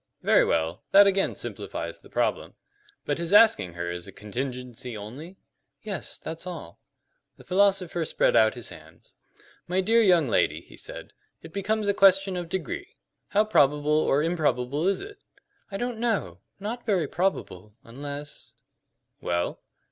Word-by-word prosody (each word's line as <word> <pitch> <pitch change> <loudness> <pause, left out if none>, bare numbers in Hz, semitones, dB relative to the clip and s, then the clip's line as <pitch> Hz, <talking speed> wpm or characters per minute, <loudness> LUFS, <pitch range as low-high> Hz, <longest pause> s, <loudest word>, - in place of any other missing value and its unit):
"Very - - +5
well. 80 +1 0
That 200 +1 +9
again 195 0 +2
simplifies - - -5
the - - -18
problem. - - -1 0.5
But - - -1
his 170 +2 -1
asking 215 - +6
her 85 0 -4
is 85 0 -6
a - - -9
contingency 125 +1 -6
only?" 140 - -9 0.5
"Yes, 200 -6 -5
that's 165 +2 -7
all." 165 - -8 0.6
The - - -15
philosopher 185 -3 +2
spread - - +1
out 110 +2 +5
his 120 - -6
hands. 80 +1 -15 0.5
"My 180 +2 0
dear 225 +5 +4
young 175 -8 +4
lady," 115 - +2
he - - -16
said, - - -9 0.3
"it - - -11
becomes 210 +2 -1
a 200 - +3
question 195 -1 +4
of 175 -2 -4
degree. 175 -7 -4 0.3
How 210 +2 +2
probable 150 -6 +3
or 150 -1 +3
improbable 155 -2 0
is 195 - +1
it?" 410 +1 -10 0.5
"I 195 - -4
don't 240 0 -3
know; 200 - -1 0.2
not 225 +4 -5
very 190 -6 +2
probable 105 - -2
unless 145 +4 -8 0.3
" - - -51
"Well?" 85 0 -2
165 Hz, 155 wpm, -26 LUFS, 125-195 Hz, 0.6 s, That